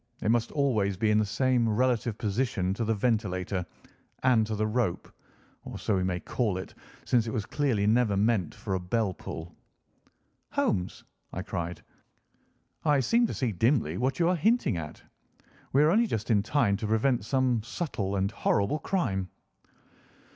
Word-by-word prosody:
It 110 Hz, -, +3 dB
must 120 Hz, 0 st, +1 dB
always 110 Hz, -10 st, +1 dB
be 110 Hz, +2 st, +2 dB
in 105 Hz, -, +4 dB
the 110 Hz, -, +2 dB
same 120 Hz, +2 st, +2 dB
relative 120 Hz, -1 st, +1 dB
position 100 Hz, -4 st, -1 dB
to 115 Hz, -, -2 dB
the 110 Hz, 0 st, +1 dB
ventilator 100 Hz, -4 st, -1 dB, 0.6 s
and 120 Hz, -4 st, +4 dB
to 110 Hz, -, -2 dB
the 110 Hz, +1 st, 0 dB
rope—or 110 Hz, -4 st, -5 dB
so 105 Hz, -, 0 dB
we 95 Hz, -, +1 dB
may 90 Hz, -1 st, -1 dB
call 105 Hz, +1 st, -1 dB
it, 95 Hz, -, -7 dB, 0.3 s
since 120 Hz, -2 st, +2 dB
it -, -, -2 dB
was 110 Hz, -4 st, -2 dB
clearly 130 Hz, -9 st, 0 dB
never 110 Hz, -2 st, +3 dB
meant 105 Hz, -4 st, +1 dB
for 100 Hz, -, -4 dB
a 95 Hz, -, 0 dB
bell 95 Hz, +2 st, -1 dB
pull." 85 Hz, -1 st, -8 dB, 1.0 s
"Holmes," 90 Hz, 0 st, -1 dB, 0.3 s
I 90 Hz, -, -4 dB
cried, 90 Hz, -4 st, -4 dB, 1.0 s
"I 150 Hz, -3 st, +3 dB
seem 235 Hz, -, +3 dB
to -, -, -4 dB
see 125 Hz, -4 st, 0 dB
dimly 110 Hz, -, +1 dB
what 130 Hz, +2 st, 0 dB
you 170 Hz, -, +2 dB
are 180 Hz, -, +3 dB
hinting 210 Hz, -, +2 dB
at. 75 Hz, -2 st, -7 dB, 0.7 s
We 140 Hz, +3 st, +4 dB
are 155 Hz, -, +4 dB
only 230 Hz, +5 st, +3 dB
just 110 Hz, -, -2 dB
in 105 Hz, -2 st, +4 dB
time 110 Hz, -3 st, +1 dB
to 110 Hz, -, -3 dB
prevent 110 Hz, +1 st, +2 dB
some 130 Hz, -1 st, +1 dB
subtle 110 Hz, -, -3 dB
and 95 Hz, +1 st, 0 dB
horrible 100 Hz, +7 st, +1 dB
crime." 100 Hz, -, -1 dB
110 Hz, 170 wpm, -28 LUFS, 100-130 Hz, 1.0 s, in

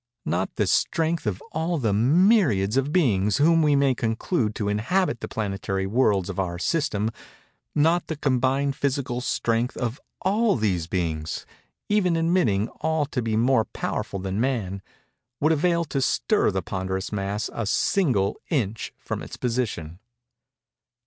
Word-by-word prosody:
Not 90 Hz, +2 st, -1 dB
the -, -, +1 dB
strength 165 Hz, -5 st, +1 dB
of 95 Hz, -3 st, -2 dB
all 165 Hz, +2 st, -1 dB
the 115 Hz, -8 st, 0 dB
myriads 130 Hz, -, +3 dB
of 135 Hz, +2 st, +1 dB
beings 105 Hz, -, +2 dB
whom 165 Hz, +3 st, +4 dB
we 150 Hz, -2 st, +4 dB
may 140 Hz, -1 st, +3 dB
conclude 115 Hz, -, -1 dB
to 105 Hz, -, -2 dB
inhabit 115 Hz, -, 0 dB
the -, -, -5 dB
planetary 95 Hz, -2 st, -2 dB
worlds 100 Hz, -3 st, +2 dB
of 100 Hz, -1 st, -5 dB
our 90 Hz, -2 st, -2 dB
system—not 150 Hz, -, -1 dB
the 160 Hz, -, -3 dB
combined 135 Hz, 0 st, +1 dB
physical 135 Hz, -3 st, -1 dB
strength 120 Hz, -1 st, 0 dB
of 120 Hz, +2 st, -3 dB, 0.2 s
all 210 Hz, +3 st, +2 dB
these 95 Hz, -8 st, 0 dB
beings—even 90 Hz, -, -2 dB
admitting 165 Hz, -, +2 dB
all 160 Hz, -2 st, +1 dB
to 135 Hz, -3 st, -3 dB
be 110 Hz, -2 st, -1 dB
more 120 Hz, -1 st, +3 dB
powerful -, -, -4 dB
than 95 Hz, +2 st, -2 dB
man—would 120 Hz, -, -3 dB
avail 170 Hz, +2 st, +2 dB
to 135 Hz, -2 st, -2 dB
stir 210 Hz, +9 st, +2 dB
the 95 Hz, -2 st, -2 dB
ponderous 95 Hz, 0 st, -3 dB
mass 100 Hz, +1 st, -2 dB
a 115 Hz, -3 st, -3 dB
single 125 Hz, -, +1 dB
inch 115 Hz, -, -1 dB
from -, -, -5 dB
its -, -, -8 dB
position. 110 Hz, -9 st, -2 dB
120 Hz, 140 wpm, -25 LUFS, 100-155 Hz, 0.2 s, whom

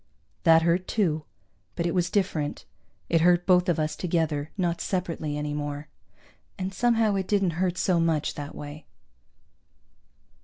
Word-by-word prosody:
That 165 Hz, -1 st, +6 dB
hurt, 170 Hz, +2 st, +1 dB
too, 160 Hz, -8 st, 0 dB, 0.5 s
but 170 Hz, -, -1 dB
it 170 Hz, -, 0 dB
was 180 Hz, -1 st, +1 dB
different. 180 Hz, -7 st, -1 dB, 0.4 s
It 165 Hz, -1 st, +2 dB
hurt 175 Hz, +1 st, +4 dB
both 180 Hz, 0 st, +4 dB
of 170 Hz, -, +2 dB
us 155 Hz, -1 st, -1 dB
together, 160 Hz, -4 st, -1 dB
not 175 Hz, -3 st, 0 dB
separately 165 Hz, -5 st, -2 dB
any 150 Hz, 0 st, -3 dB
more. 145 Hz, 0 st, -4 dB, 0.7 s
And 190 Hz, 0 st, -3 dB
somehow 225 Hz, 0 st, +2 dB
it 190 Hz, -1 st, -1 dB
didn't 195 Hz, -4 st, +2 dB
hurt 180 Hz, -1 st, 0 dB
so 180 Hz, -2 st, +2 dB
much 160 Hz, -3 st, +1 dB
that 145 Hz, 0 st, -7 dB
way. 145 Hz, +1 st, -9 dB
170 Hz, 150 wpm, -26 LUFS, 155-185 Hz, 0.7 s, That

